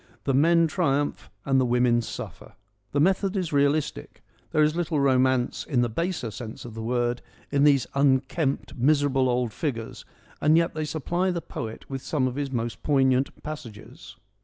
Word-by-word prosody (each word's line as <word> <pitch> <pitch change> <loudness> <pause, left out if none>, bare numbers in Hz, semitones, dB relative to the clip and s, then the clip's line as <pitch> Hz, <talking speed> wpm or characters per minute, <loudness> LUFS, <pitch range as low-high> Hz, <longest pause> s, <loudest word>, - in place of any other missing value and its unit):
The 135 - 0
men 165 +5 +4
triumph 145 -4 -1 0.2
and 135 -1 +3
the - - +2
women 120 -1 +3
suffer. - - -8 0.4
The 145 - 0
method 190 +4 +2
is 180 -5 -2
realistic: 140 - 0 0.3
there 155 - +3
is 150 +1 +2
little 170 -3 0
romance, 130 -2 +2
in 130 -5 0
the 120 - 0
baser 165 - -2
sense 115 0 -8
of 120 - -8
the 115 - -6
word, 120 +1 -1 0.3
in 140 0 +3
these 140 -4 +4
unkempt, 140 +1 +1
miserable, 135 0 +2
old 120 -3 0
figures, 120 -8 -4 0.4
and 155 +2 +5
yet 170 0 +2
they 155 0 -2
supply 170 +5 -1
the 175 -2 -1
poet 115 -8 -7
with 135 -1 -5
some 135 -3 0
of 125 - -3
his 140 0 -3
most 120 -2 -3
poignant 135 -2 +1
passages. 120 -9 -9
140 Hz, 170 wpm, -26 LUFS, 125-155 Hz, 0.4 s, and